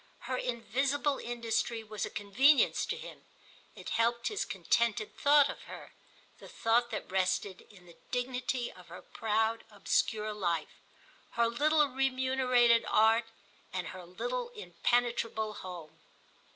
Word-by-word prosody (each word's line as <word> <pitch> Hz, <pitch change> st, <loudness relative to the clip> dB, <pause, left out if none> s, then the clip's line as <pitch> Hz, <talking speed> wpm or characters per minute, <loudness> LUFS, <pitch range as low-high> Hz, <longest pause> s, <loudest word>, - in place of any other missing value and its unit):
Her 255 Hz, -, -3 dB
invisible 270 Hz, +4 st, -1 dB
industry 235 Hz, -1 st, -2 dB
was 215 Hz, -2 st, -4 dB
a -, -, -8 dB
convenience 260 Hz, +9 st, +3 dB
to -, -, -2 dB
him; -, -, -10 dB, 0.5 s
it -, -, -8 dB
helped 235 Hz, +1 st, +1 dB
his 210 Hz, -, -2 dB
contented 215 Hz, +4 st, 0 dB
thought 285 Hz, 0 st, +5 dB
of -, -, -8 dB
her, -, -, -10 dB, 0.5 s
the -, -, -12 dB
thought 235 Hz, +1 st, +1 dB
that -, -, -6 dB
rested 185 Hz, 0 st, 0 dB
in 185 Hz, -4 st, -17 dB
the 170 Hz, -1 st, -16 dB
dignity 250 Hz, 0 st, -2 dB
of 180 Hz, -1 st, -16 dB
her 175 Hz, +2 st, -11 dB
proud 225 Hz, +1 st, -1 dB
obscure 215 Hz, +1 st, 0 dB
life, 170 Hz, -6 st, -2 dB, 0.5 s
her 235 Hz, 0 st, +2 dB
little 295 Hz, +5 st, +3 dB
remunerated 255 Hz, -3 st, +3 dB
art 225 Hz, +2 st, +4 dB, 0.5 s
and 180 Hz, -3 st, -3 dB
her 185 Hz, -, -9 dB
little 485 Hz, -, -4 dB
impenetrable 235 Hz, -, -1 dB
home. 175 Hz, -6 st, -9 dB
230 Hz, 130 wpm, -31 LUFS, 210-255 Hz, 0.5 s, thought